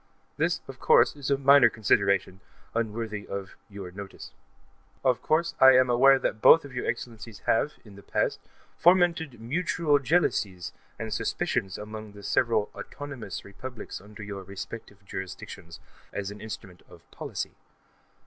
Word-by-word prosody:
This, - - 0
of - - -10
course, - - +5
is 145 -2 -5
a 140 - +3
minor 140 -2 +7
consideration, 100 -4 +1 0.3
unworthy 110 -2 -3
of 100 -1 -5 0.2
Your 100 -3 -8
notice. 100 +1 -9 0.7
Of 130 -2 +3
course, 170 +2 +1
I 130 0 +9
am 130 -1 +4
aware 135 +3 +6
that 110 -4 -2
both 165 - +8
your 125 -3 -5
Excellencies 115 -2 -5
have, 150 +6 +2
in 105 -2 -13
the 100 - -12
past, - - -1 0.4
fomented 170 -6 +3
mutual 150 +4 +1
jealousies 105 - 0 0.2
and 110 -1 -4
suspicions 95 -1 -1
among 110 0 -8
the 100 0 -12
several 110 -1 +1
"autonomous" 135 -10 -7
republics 115 +3 -8
under 105 +2 -11
your 100 -1 -6
respective 100 +1 -9
jurisdictions, 90 -2 -8 0.3
as 100 0 -4
an 105 - -10
instrument 100 -5 -8
of - - -15
policy. - - -5
110 Hz, 140 wpm, -27 LUFS, 100-135 Hz, 0.7 s, I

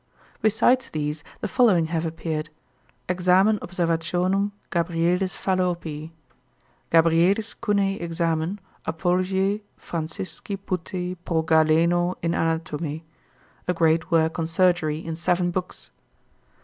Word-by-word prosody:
Besides 235 +4 +3
these 150 0 -3 0.2
the - - -1
following 210 -10 +4
have 165 0 0
appeared: 160 -1 -4 0.6
"Examen 185 +4 +3
Observationum 180 +3 0 0.2
Gabrielis 175 +2 0
Fallopii;" 175 -5 -1 0.8
"Gabrielis 170 +6 +3
Cunei 200 -2 +1
Examen, 165 +2 -1 0.3
Apologiæ 190 +4 0 0.2
Francisci 165 +4 -5
Putei 180 -1 -4
pro 160 -2 0
Galeno 165 +3 +3
in 170 - +1
Anatome;" 160 -1 -2 0.6
a 180 - +2
great 160 0 +2
work 165 0 +2
on 160 - 0
Surgery 165 -3 +2
in 165 0 -5
seven 175 +2 +1
books. 180 0 -5
170 Hz, 100 wpm, -24 LUFS, 160-185 Hz, 0.8 s, following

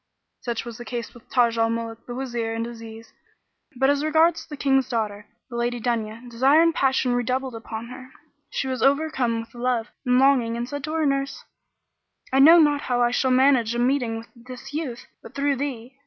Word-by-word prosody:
Such 235 -1 -3
was 235 0 -8
the - - -6
case 240 -1 -5
with 240 - -17
Taj 235 -2 +2
al 225 0 +3
Muluk, 230 0 -5
the 240 - -6
Wazir 235 -3 -3
and 230 0 -2
Aziz 225 -1 -10 0.6
but 265 +2 +2
as 285 +1 +2
regards 320 +2 +2
the 295 -2 -8
King's 270 -1 +2
daughter, 210 -3 -3 0.2
the 240 - -9
Lady 240 0 -1
Dunya, 230 0 -3
desire 260 +6 +3
and 335 0 +3
passion 265 -3 +1
redoubled 255 +1 -1
upon 225 0 -7
her; 255 0 -10 0.4
she 270 - -3
was 260 -3 -3
overcome 270 -5 +1
with 225 - -14
love 240 -1 -1
and 250 0 +2
longing 255 -4 +3
and 240 - -2
she 245 - -13
said 285 -1 -5
to 310 - -5
her 320 -1 +1
nurse, 275 -1 -1 0.9
"I 265 - +4
know 320 +5 +9
not 295 -3 +4
how 245 -3 -1
I 240 - +2
shall 260 +1 +1
manage 255 -3 +3
a - - -1
meeting 245 -2 +1
with 225 - -10
this 250 +3 -11
youth, 285 -6 -4 0.2
but - - -13
through 280 0 0
thee." 255 -3 -5
245 Hz, 205 wpm, -24 LUFS, 230-275 Hz, 0.9 s, know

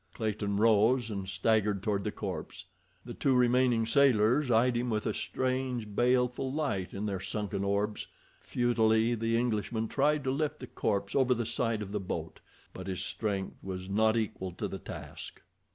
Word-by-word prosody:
Clayton 105 -3 -1
rose 115 +2 +4
and 100 -2 -4
staggered 105 +1 +1
toward 100 -2 0
the - - -2
corpse. - - -6 0.4
The - - -6
two 135 -2 +1
remaining 125 -2 +3
sailors 125 +1 +4
eyed 120 +2 +3
him 120 +1 0
with 110 -2 -1
a 110 - 0
strange, 130 -5 -2
baleful 125 +2 +2
light 135 -11 -2
in 100 +2 -4
their 100 -3 -2
sunken 100 0 -3
orbs. 100 +2 -1 0.3
Futilely 115 -1 +2
the 115 0 0
Englishman 115 -1 -1
tried 145 +3 +1
to 130 - 0
lift 150 +2 -1
the 130 - -8
corpse 100 -4 -2
over 130 -2 +3
the 120 -1 -2
side 115 -1 -1
of 100 - -8
the 105 - -1
boat, 95 - -5 0.3
but 95 0 -8
his 95 -2 -3
strength 100 -3 -3
was 95 0 -6
not 110 +2 +3
equal 95 -4 -2
to - - -3
the - - -6
task. - - -8
110 Hz, 170 wpm, -30 LUFS, 105-125 Hz, 0.4 s, rose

